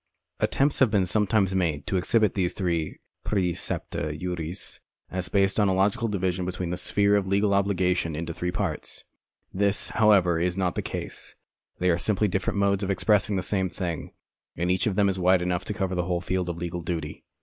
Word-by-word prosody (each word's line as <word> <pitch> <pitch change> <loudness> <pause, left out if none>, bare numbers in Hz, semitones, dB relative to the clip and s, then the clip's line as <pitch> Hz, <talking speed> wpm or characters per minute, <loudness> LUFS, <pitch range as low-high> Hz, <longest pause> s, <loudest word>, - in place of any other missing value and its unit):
Attempts 140 +2 +1
have 130 - +5
been 100 -3 +2
sometimes 100 0 +2
made 85 -6 0
to - - -2
exhibit 105 +3 +2
these 90 -3 0
three 85 -5 -2 0.3
praecepta 90 -5 -2
juris 90 -1 -5 0.3
as 90 -1 -3
based 100 +1 +2
on 105 - +4
a 95 - +2
logical 100 +4 +2
division 95 -3 -1
of 90 - -6
the 90 -1 -2
sphere 100 +2 +2
of 100 -2 +1
legal 100 +1 +2
obligation 90 -4 +1
into 85 +1 -4
three 90 +2 -3
parts. 90 -4 -4 0.5
This, 100 +1 0
however, 100 -7 +4
is 90 +2 0
not 90 -2 +1
the - - -2
case. - - -6 0.4
They 90 0 +2
are 85 - +1
simply 105 +2 +2
different 95 +1 -1
modes 100 0 +2
of 100 - -2
expressing 100 +1 +2
the 95 - -1
same 95 -1 +1
thing, 85 -2 -4 0.5
and 90 +2 0
each 95 +3 +1
of 100 - 0
them 100 0 +3
is 95 -1 -1
wide 90 0 +4
enough 90 +1 -1
to - - -3
cover 95 -3 -1
the 90 -1 -1
whole 90 -1 0
field 90 0 -2
of 85 - -4
legal 85 0 -4
duty. 80 -2 -4
95 Hz, 195 wpm, -26 LUFS, 90-100 Hz, 0.5 s, have